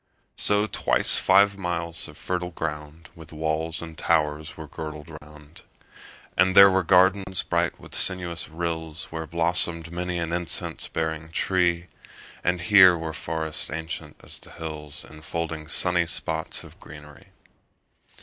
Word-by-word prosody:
5 - - -8
So 105 +1 +3
twice - - +4
five 100 +1 +4
miles 85 -3 -3
of - - -13
fertile 90 -1 -3
ground 80 0 -6
With 80 -3 -13
walls 80 +1 -2
and 80 -1 -9
towers 80 +1 0
were 80 - -7
girdled 75 +1 -8
round: 75 +1 -15 0.7
And 95 +1 +3
there 100 0 +10
were 95 0 +3
gardens 95 +1 +3
bright - - -1
with - - -13
sinuous 85 -2 0
rills 80 -1 -4
Where 80 -1 -5
blossom'd 85 0 +1
many 90 0 -3
an 85 0 -3
incense 85 -1 -2
bearing 80 0 -3
tree; 85 0 +1 0.6
And 90 -1 0
here 95 -2 +7
were 80 -1 -5
forests 80 -1 -3
ancient 80 -1 -6
as - - -5
the - - -12
hills, 75 -3 -7
10 75 - -13
Enfolding 80 0 -5
sunny 85 +1 +2
spots 80 -1 -3
of - - -15
greenery. - - -13
85 Hz, 145 wpm, -25 LUFS, 80-90 Hz, 0.7 s, there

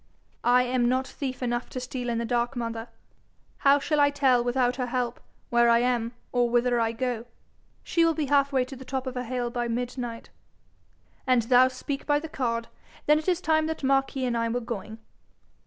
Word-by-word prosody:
'I 250 +1 +5
am 245 -1 +1
not 260 +1 +1
thief 260 -2 -5
enough 240 0 -2
to 255 - -5
steal 250 0 -4
in 235 - -1
the 235 - -1
dark, 240 +2 0
mother. 230 -1 -4 0.7
How 280 0 +5
shall 290 +1 0
I 285 0 +5
tell 265 -4 +3
without 245 0 +1
her 250 -2 -2
help 245 -1 -2 0.3
where 235 0 +4
I 235 - +6
am 240 -1 0 0.2
or 245 -1 +2
whither 240 0 +2
I 225 -1 +1
go?' 240 -1 -3 0.6
'She 335 - +2
will 330 -1 +3
be 305 - -1
half 280 0 +3
way 260 -2 +2
to 270 - -9
the 260 - -10
top 265 0 -4
of 260 - -4
her 250 0 -3
hill 245 0 -2
by 240 0 -2
midnight.' 240 0 -4 1.0
'An' 255 -2 +4
thou 250 +2 +5
speak 265 +2 -5
by 290 -1 +3
the 320 - -7
card, 235 -6 -2 0.4
then 300 +1 +5
is 315 - -9
it 365 0 +1
time 315 0 +2
that 320 -2 -4
Marquis 270 0 +1
and 245 -1 0
I 230 0 0
were 240 +2 -1
going.' 225 -2 -6
250 Hz, 205 wpm, -26 LUFS, 240-270 Hz, 1.0 s, I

